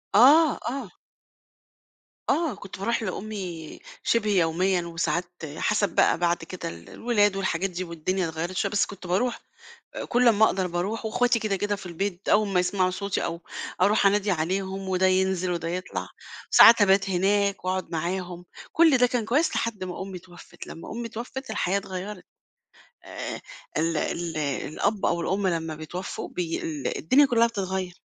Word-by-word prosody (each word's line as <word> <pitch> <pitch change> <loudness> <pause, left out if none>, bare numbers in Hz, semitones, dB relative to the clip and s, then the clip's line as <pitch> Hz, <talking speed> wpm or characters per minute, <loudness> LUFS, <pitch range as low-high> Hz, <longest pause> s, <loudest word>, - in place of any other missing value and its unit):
آه، 290 +7 +7
آه. 255 -4 -5 1.4
آه، 330 -1 +1
كنت 190 -1 -10
باروح 230 +3 0
لأمي 185 -5 -5 0.2
شِبه 225 -2 +1
يوميًا 180 0 +2
وساعات 170 +1 -1 0.3
حَسَب 210 -1 +1
بقى - - +4
بعد 175 0 +1
كده 170 - -6
ال 85 0 -11
الولاد 205 -4 +1
والحاجات 195 -1 -1
دي 180 0 -4
والدنيا 175 +1 -2
اتغيّرت 165 +3 -4
شوية، - - 0
بس 205 - +2
كنت 195 -2 -10
باروح، 210 +8 0 0.5
آآ - - -4
كل 245 0 +3
امّا 220 -1 +5
أقدر 185 -3 0
باروح 180 +6 -3
واخواتي 240 +2 +2
كده، 215 -3 -1
كده 205 +1 -1
في 200 - -10
البيت 180 +2 -4
أول 210 -1 +4
ما 190 -2 +2
يسمعوا 185 0 +1
صوتي 200 +1 -2
أو 170 0 -4 0.4
أروح 200 +2 +4
أنادي 205 +1 +3
عليهم 190 +3 -2
وده 185 0 +2
ينزل 185 -1 +1
وده 170 -1 -2
يطلع، 180 +2 -4 0.4
ساعات 230 -2 +9
أبات 195 0 +4
هناك 200 +1 +1
وأقعُد 185 -2 -2
معاهم، 175 +1 -3 0.3
كل 320 -4 +5
ده 250 - +5
كان 240 -2 -1
كويس 285 +9 +1
لحد 220 -5 -2
ما 180 0 -5
أمي 190 -1 -7
اتوفّت، 175 0 -13
لمّا 165 - -9
أمي 235 +1 -4
اتوفّت، 240 +3 -7
الحياة 200 -2 0
اتغيّرت. 190 0 -7 0.8
آآ - - -6 0.4
ال 165 0 +1
ال 170 +2 -2
الأب 155 - -1
أو 170 - +1
الأم 190 +4 0
لمّا 165 -3 -1
بيتوفّوا 160 +4 -6
بي 170 -2 -3
ال 150 -4 -3
الدنيا 275 - +5
كُلّها 235 -3 +4
بتتغيّر. 190 -4 -3
190 Hz, 160 wpm, -26 LUFS, 175-210 Hz, 1.4 s, ساعات